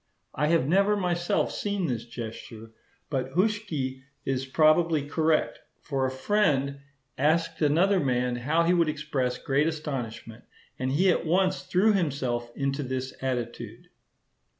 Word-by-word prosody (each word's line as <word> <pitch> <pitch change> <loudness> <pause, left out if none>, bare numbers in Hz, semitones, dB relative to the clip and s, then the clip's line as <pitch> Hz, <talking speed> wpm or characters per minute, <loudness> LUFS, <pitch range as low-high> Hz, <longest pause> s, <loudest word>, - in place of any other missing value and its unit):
I 150 +3 0
have 165 -4 +2
never 200 +5 +3
myself 175 -2 0
seen 200 -3 -2
this 120 -7 -2
gesture; 115 -1 -8 0.4
but 130 -1 -2
Huschke 175 -10 -1 0.2
is 135 0 -1
probably 155 +1 +3
correct; 160 +1 +1 0.2
for 135 -3 -1
a - - -1
friend 140 -2 +1 0.4
asked 165 +3 +1
another 175 +7 +3
man 125 -4 0
how 150 +7 +1
he 170 +2 +3
would 170 -3 +3
express 140 -5 -2
great 140 +3 +1
astonishment, 120 -8 -5 0.4
and 130 0 -1
he 180 +7 +4
at - - 0
once 185 +3 +1
threw 205 +4 +3
himself 130 -9 -1
into 140 +1 -1
this 130 -1 -4
attitude. 125 -3 -4
145 Hz, 135 wpm, -27 LUFS, 130-170 Hz, 0.4 s, he